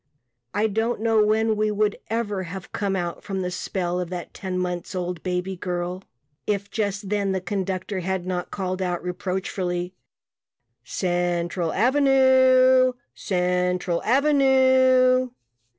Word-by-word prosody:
I 210 +1 +2
don't 225 +2 0
know 225 -1 +3
when 220 +1 +2
we 215 0 +1
would 210 0 0
ever 210 -3 -1
have 185 +1 -8
come 200 -2 -1
out 175 -2 -4
from 195 -2 -3
the 180 0 -3
spell 180 -1 -2
of 180 -2 -3
that 180 -2 -6
ten 185 -2 -4
months 180 0 -3
old 180 -2 -3
baby 180 +1 -2
girl 180 0 -4 0.5
if 200 -1 -2
just 205 -2 -2
then 200 -2 0
the 190 - 0
conductor 190 +1 -3
had 185 0 -2
not 180 -1 -3
called 185 -1 -3
out 175 -2 -2
reproachfully 180 -1 -3 0.9
"Central 175 +1 -1
Avenue 260 0 +5 0.2
Central 180 -1 0
Avenue." 260 -1 +4
190 Hz, 130 wpm, -24 LUFS, 180-225 Hz, 0.9 s, Avenue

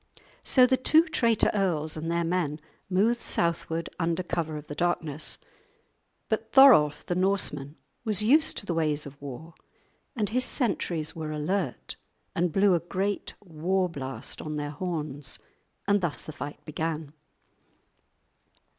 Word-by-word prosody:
So 255 -2 +6
the 260 +1 +2
two 310 +5 +5
traitor 235 -9 +2
earls 170 -7 0
and 160 +1 -4
their 170 0 +1
men 165 -3 -1 0.3
moved 215 +6 +2
southward 165 -3 -1
under 170 +1 0
cover 160 -3 -2
of 150 - -8
the 145 - -7
darkness. 155 -2 -1 0.9
But 220 0 -2
Thorolf 235 - +7
the - - -1
Norseman 175 -6 0 0.3
was 215 -3 +2
used 300 +8 +4
to - - -4
the 175 - -1
ways 155 -2 0
of 140 0 -11
war, 145 +4 -8 0.6
and 215 -4 -1
his 255 +3 +1
sentries 180 - 0
were 160 -2 -5
alert 155 -1 -3 0.4
and 175 0 0
blew 195 +2 +4
a 175 - +3
great 190 +4 -3
war 180 +2 0
blast 135 -7 -4
on 155 -1 -5
their 145 -1 -3
horns. 150 -4 -4 0.5
And 200 0 +3
thus 170 -4 -2
the - - -7
fight 145 +1 -8
began. 155 -1 -4
170 Hz, 145 wpm, -27 LUFS, 150-200 Hz, 0.9 s, Thorolf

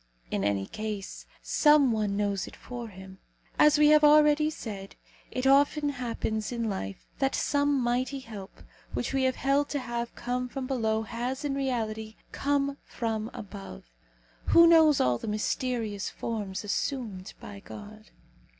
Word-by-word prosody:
In 100 - -1
any 100 -1 0
case, 215 - -6 0.2
some 295 -4 +5
one 210 -3 0
knows 200 -3 -1
it - - -11
for 240 -2 -7
him. 190 -1 -12 0.4
As 300 0 +6
we 300 0 +6
have 305 0 +6
already 300 0 +6
said, 200 -9 -7 0.3
it 255 +1 -3
often 285 +2 +4
happens 230 -4 -3
in 235 -2 -2
life 95 - -5
that 270 0 +1
some 285 -1 +1
mighty 250 +2 0
help 210 -5 -10 0.3
which 245 - -2
we 265 -1 +2
have 260 -1 +1
held 280 +1 +1
to 285 - -1
have 235 -2 -4
come 250 +1 -3
from 265 +1 -4
below 220 -4 0
has, 245 +5 -4
in 285 - 0
reality, 220 -5 -2 0.2
come 280 0 0
from 225 -1 -3
above. 95 - -9 0.5
Who 335 - +7
knows 320 -3 +6
all 125 -2 +2
the - - -7
mysterious 215 -1 -2
forms 210 -4 -4
assumed 210 -3 -3
by 200 -1 -9
God? 215 +2 -11
235 Hz, 150 wpm, -28 LUFS, 210-275 Hz, 0.5 s, Who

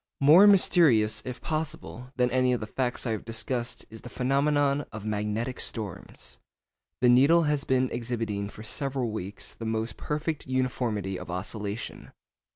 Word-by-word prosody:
More 160 +9 +8
mysterious, 130 - +4
if 125 -1 -6
possible, 155 -5 -5
than 125 -1 +1
any 130 0 +2
of 125 - 0
the 110 - -4
facts 125 +4 -2
I 115 - -1
have 110 - -3
discussed 120 +2 -3
is 110 - -10
the 125 - -9
phenomenon 140 +2 +1
of 110 -1 -8
magnetic 110 +4 -2
storms. 105 -6 -5 0.6
The 125 - +5
needle 140 +8 +6
has 150 -2 0
been 130 0 +2
exhibiting 115 -4 -3
for 105 - -11
several 130 0 -2
weeks 100 -1 -5
the 115 - -8
most 110 +1 -2
perfect 150 0 -3
uniformity 120 -7 -1
of - - -9
oscillation. 100 +4 -5
125 Hz, 155 wpm, -27 LUFS, 110-140 Hz, 0.6 s, More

